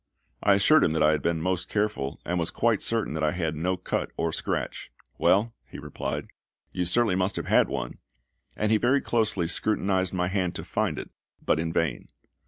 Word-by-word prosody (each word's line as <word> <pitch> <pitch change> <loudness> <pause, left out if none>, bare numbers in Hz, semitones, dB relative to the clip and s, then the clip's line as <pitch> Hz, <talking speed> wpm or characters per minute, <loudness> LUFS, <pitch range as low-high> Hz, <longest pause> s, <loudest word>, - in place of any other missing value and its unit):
I 100 - +5
assured 155 +11 +5
him 80 - +2
that 80 - +2
I 75 - +5
had 75 - 0
been 85 -1 0
most 90 0 -1
careful, 105 -10 -1
and 90 +2 -1
was 85 - 0
quite 115 -3 +1
certain 115 -8 0
that 80 0 -2
I 75 - +2
had 80 -3 -2
no 90 +4 -1
cut - - -2
or 85 -1 -1
scratch. - - -3 0.3
"Well," 110 +4 +3 0.2
he - - -9
replied, 75 0 -4 0.5
"you 90 -1 -2
certainly 110 +3 +3
must 95 +1 0
have - - -3
had - - +4
one;" - - -4 0.6
and 105 0 +1
he 110 - +4
very 130 +4 +3
closely 110 -7 0
scrutinised 95 -1 0
my 90 -1 0
hand 95 -2 -1
to - - -4
find - - -1
it, - - -7 0.3
but - - +2
in 80 +1 -1
vain. 80 -6 -1
90 Hz, 200 wpm, -26 LUFS, 80-105 Hz, 0.6 s, I